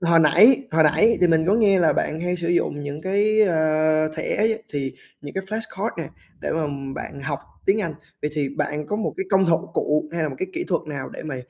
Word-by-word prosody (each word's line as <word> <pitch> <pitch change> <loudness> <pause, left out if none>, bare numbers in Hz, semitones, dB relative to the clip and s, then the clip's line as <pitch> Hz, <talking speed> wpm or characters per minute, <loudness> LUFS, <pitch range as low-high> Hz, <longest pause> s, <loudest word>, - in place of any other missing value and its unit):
hồi 170 -2 +4
nãy, 220 - +6
hồi 160 0 +4
nãy 210 +10 +4
thì 180 - +6
mình 160 0 +2
có 200 - +4
nghe 205 -4 +4
là 165 -3 +4
bạn 155 +2 -2
hay 180 +1 -1
sử 170 -1 -3
dụng 145 -4 0
những 145 +1 -5
cái, 210 +3 +2
ờ, 155 -3 +2
thẻ 210 +7 0 0.3
thì 135 -2 -2 0.3
những 145 +3 -9
cái 190 0 -3
flash 220 +1 -6
card 215 +4 -2
nè 160 - -4 0.3
để - - -3
mà 160 -2 0 0.3
bạn 140 - -7
học 135 - -3 0.3
tiếng 205 +3 +3
Anh, 165 -5 -3 0.3
vậy 150 - -1
thì 145 -3 0
bạn 150 +2 -3
có 210 - -2
một 220 - -2
cái 385 - -2
công 190 0 +4
họng 170 -2 +1
cụ 150 +1 0
hay 170 - -1
là 155 - 0
một 135 - -6
cái 185 - -3
kỹ - - -3
thuật 170 -2 0
nào 140 -3 -5
để - - -8
mà 150 -4 -5
165 Hz, 245 wpm, -23 LUFS, 150-195 Hz, 0.3 s, nãy